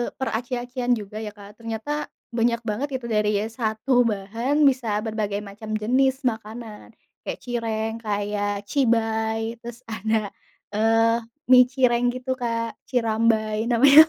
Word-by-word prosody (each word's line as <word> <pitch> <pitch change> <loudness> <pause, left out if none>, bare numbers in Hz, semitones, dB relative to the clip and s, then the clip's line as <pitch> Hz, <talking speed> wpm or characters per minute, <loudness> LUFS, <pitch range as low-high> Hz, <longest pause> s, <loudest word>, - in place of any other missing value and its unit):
peraci-acian 245 0 -1
juga 210 -1 -7
ya, 215 -1 -5
Kak, 205 +1 -13
ternyata 230 +7 -3 0.3
banyak 235 0 +2
banget 230 +6 -1
itu 250 - -10
dari 210 -1 +2 0.2
1 225 +1 -2 0.2
bahan 225 +8 -1
bisa 240 -6 +2
berbagai 210 -2 -2
macam 210 +2 -7
jenis 265 +4 +2
makanan, 220 -1 -4 0.3
kayak - - -5
cireng, 225 -2 -1
kayak 205 -1 -1
cibay 225 -3 +1
terus 235 0 -8
ada, 220 -1 -1 0.4
eee, 225 +2 +3 0.3
mie 250 0 +9
cireng 250 -2 +2
gitu, 255 +1 -3
Kak, 230 -1 -1 0.2
cirambay 225 -2 +1
namanya, 275 +5 +9
225 Hz, 125 wpm, -24 LUFS, 215-245 Hz, 0.4 s, mie